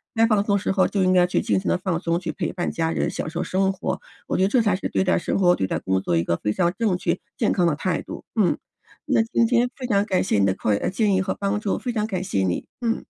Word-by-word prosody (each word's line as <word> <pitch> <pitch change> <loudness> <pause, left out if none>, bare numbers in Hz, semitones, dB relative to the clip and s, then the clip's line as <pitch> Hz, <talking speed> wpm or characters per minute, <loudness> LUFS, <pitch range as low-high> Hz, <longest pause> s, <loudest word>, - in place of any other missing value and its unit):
该 225 0 +5
放 215 -3 +3
松 200 -1 +2
时 200 - -1
候 190 -1 +3
就 200 -2 0
应 185 - +3
该 180 -1 +4
去 180 - 0
尽 - - +1
情 190 - -6
地 - - +2
放 180 -2 -2
松， 170 -1 0
去 170 -2 -4
陪 - - -3
伴 175 -2 -2
家 165 -1 -1
人 - - 0
享 - - -4
受 170 +2 -3
生 190 +1 +1
活， 190 - -3 0.3
我 - - -1
觉 185 - +2
得 - - +4
这 240 +4 +3
才 205 -4 +1
是 - - -3
对 - - 0
待 185 - +2
生 - - -1
活、 180 -2 +5
对 95 - 0
待 - - -1
工 95 0 0
作 85 - 0
一 85 - +2
个 85 - 0
非 105 - -1
常 175 +5 +1
正 210 -6 +2
确、 175 0 -1 0.2
健 220 - +1
康 180 -3 +2
的 160 - +1
态 175 +3 -1
度。 - - -9 0.2
嗯， 195 - +3 0.5
那 265 -6 +3
今 230 +1 +1
天 245 +1 +2
非 260 - -6
常 200 -3 +2
感 190 -3 +1
谢 185 - +1
你 100 - +4
的 95 - +2
括 105 +2 0
建 205 +1 +1
议 190 - +2
和 190 0 -1
帮 200 +1 -1
助， 210 -2 -1
非 250 - -3
常 215 -2 0
感 185 -4 -3
谢 100 - -1
你， 90 -2 -2
嗯。 230 -1 -1
190 Hz, 320 characters per minute, -23 LUFS, 170-210 Hz, 0.5 s, 该